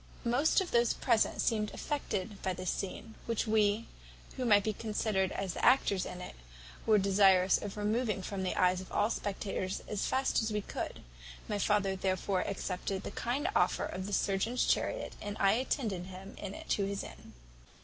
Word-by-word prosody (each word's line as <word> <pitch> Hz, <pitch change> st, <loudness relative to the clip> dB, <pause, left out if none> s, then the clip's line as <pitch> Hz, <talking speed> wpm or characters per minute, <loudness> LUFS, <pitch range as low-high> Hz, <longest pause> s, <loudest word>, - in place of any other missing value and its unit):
"Most 275 Hz, +10 st, +3 dB
of 370 Hz, -, -4 dB
those 235 Hz, -1 st, +3 dB
present 230 Hz, -4 st, +2 dB
seemed 210 Hz, -2 st, +1 dB
affected 210 Hz, -9 st, -3 dB
by 190 Hz, -, -1 dB
this 185 Hz, 0 st, -2 dB
scene, 220 Hz, +3 st, -5 dB
which 230 Hz, -2 st, 0 dB
we, 215 Hz, 0 st, +2 dB, 0.5 s
who 255 Hz, -, -2 dB
might 205 Hz, -3 st, +5 dB
be 215 Hz, -, 0 dB
considered 210 Hz, -3 st, 0 dB
as 195 Hz, -2 st, -3 dB
the -, -, -6 dB
actors 225 Hz, -6 st, +4 dB
in 180 Hz, -, -7 dB
it, -, -, -7 dB, 0.5 s
were 215 Hz, -1 st, +6 dB
desirous 195 Hz, -2 st, +5 dB
of 205 Hz, 0 st, -6 dB
removing 210 Hz, -1 st, 0 dB
from 195 Hz, +1 st, -4 dB
the 185 Hz, -, -1 dB
eyes 180 Hz, 0 st, +3 dB
of 185 Hz, -, -11 dB
all 210 Hz, +2 st, +2 dB
spectators 195 Hz, -2 st, -3 dB
as 210 Hz, -1 st, -1 dB
fast 265 Hz, -1 st, +1 dB
as 220 Hz, 0 st, -1 dB
we 210 Hz, 0 st, 0 dB
could; -, -, -5 dB, 0.4 s
my 205 Hz, -, -1 dB
father 200 Hz, -2 st, +2 dB
therefore 185 Hz, 0 st, 0 dB
accepted 190 Hz, 0 st, -3 dB
the -, -, -5 dB
kind 260 Hz, +7 st, -1 dB
offer -, -, +2 dB
of 185 Hz, +1 st, -5 dB
the 205 Hz, -, -5 dB
surgeon's 200 Hz, +6 st, +1 dB
chariot, -, -, 0 dB
and 205 Hz, 0 st, -5 dB
I 195 Hz, -, +5 dB
attended 220 Hz, -5 st, -1 dB
him 190 Hz, +1 st, -9 dB
in 200 Hz, -1 st, -5 dB
it -, -, -9 dB
to 200 Hz, -, +2 dB
his 200 Hz, 0 st, -3 dB
inn. -, -, -11 dB
205 Hz, 185 wpm, -32 LUFS, 190-225 Hz, 0.5 s, were